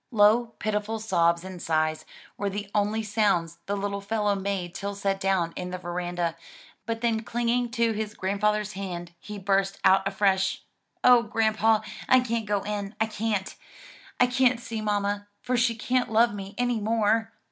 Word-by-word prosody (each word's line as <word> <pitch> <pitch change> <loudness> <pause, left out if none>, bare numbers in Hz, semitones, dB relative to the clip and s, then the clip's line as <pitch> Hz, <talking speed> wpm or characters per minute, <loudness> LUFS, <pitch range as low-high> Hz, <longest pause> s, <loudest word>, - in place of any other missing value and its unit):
Low 225 +1 +4
pitiful 215 +1 -2
sobs 170 -5 +2
and 185 -2 -8
sighs 155 -1 0 0.3
were 200 - -2
the 200 0 -5
only 210 +1 +1
sounds 185 -6 +1
the 205 +1 -1
little 200 0 -3
fellow 210 0 0
made 195 -3 -3
till 200 0 -4
set 195 -1 -1
down 190 -4 +1
in 180 0 -4
the 185 - -4
veranda; 175 -1 -3 0.5
but 225 0 -2
then 230 -2 +1
clinging 240 +2 0
to 235 -1 +1
his 215 -1 -4
grandfather's 210 +2 0
hand, 175 -3 -6
he 210 +3 -8
burst 195 0 +1
out 190 +1 +5
afresh, 195 -1 +1 0.4
"O 250 -1 +7
grandpa, 220 -1 +2 0.3
I 260 - +7
can't 230 -3 -2
go 205 -1 0
in! 205 0 -4
I 220 - +3
can't, 215 -3 -2 0.7
I 250 - +7
can't 250 -1 +2
see 230 -2 -5
mamma, 205 -1 -1
for 250 0 -1
she 235 -1 +2
can't 250 +1 0
love 230 +1 +4
me 195 0 -7
any 245 -2 +1
more." 225 +1 +1
205 Hz, 170 wpm, -26 LUFS, 195-225 Hz, 0.7 s, O